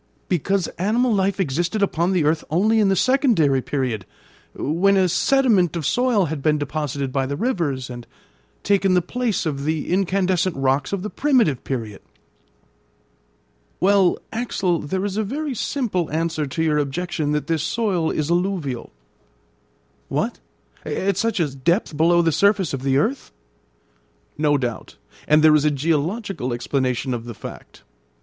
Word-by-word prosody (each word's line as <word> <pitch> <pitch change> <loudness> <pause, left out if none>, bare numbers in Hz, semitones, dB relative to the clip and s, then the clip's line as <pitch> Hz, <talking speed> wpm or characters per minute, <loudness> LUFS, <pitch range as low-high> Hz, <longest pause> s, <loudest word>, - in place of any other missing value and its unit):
"Because 190 +2 0
animal 230 +6 +2
life 195 -1 0
existed 175 +5 0
upon 175 -1 +1
the 180 -4 +2
earth 155 +1 +1
only 215 +8 +2
in 205 -2 +3
the 195 - +3
secondary 210 - +3
period, 125 -7 -2 0.5
when 190 +7 +2
a 190 -1 +4
sediment 205 - +2
of 165 -4 -3
soil 245 - +2
had 155 -2 -4
been 150 +1 +2
deposited 145 -2 -3
by 135 -1 0
the 140 - -3
rivers, 155 - -1
and 120 -1 -9 0.6
taken 195 -2 +2
the 180 - +4
place 240 0 -2
of 140 -3 -2
the 155 0 -2
incandescent 185 -1 +1
rocks 135 +1 0
of 200 -2 -2
the 210 - -4
primitive 250 - +2
period." 115 -6 -5 1.8
"Well, 195 -1 +3 0.2
Axel, 195 -7 -1
there 185 +7 -3
is 200 0 -3
a 220 - +1
very 280 +7 -3
simple 220 - -2
answer 160 -1 -1
to 160 +4 -2
your 150 -2 +2
objection 155 +1 -2
that 150 - -1
this 165 -2 0
soil 180 -2 0
is 155 +2 -1
alluvial." 175 -8 -1 1.2
"What! - - -2 0.4
at 195 0 -1
such 225 -1 0
a 145 -5 -1
depth 170 - 0
below 170 +3 +4
the 165 - +2
surface 200 -1 +2
of 135 - -3
the 135 0 +1
earth?" 245 - -1 1.0
"No 145 -1 +2
doubt; 120 -4 -4 0.3
and 150 +1 +4
there 155 -1 +7
is 150 -1 +4
a 150 - +4
geological 160 - -1
explanation 130 +1 -1
of 120 -1 -5
the 120 -2 -7
fact. - - -11
170 Hz, 155 wpm, -22 LUFS, 145-200 Hz, 1.8 s, there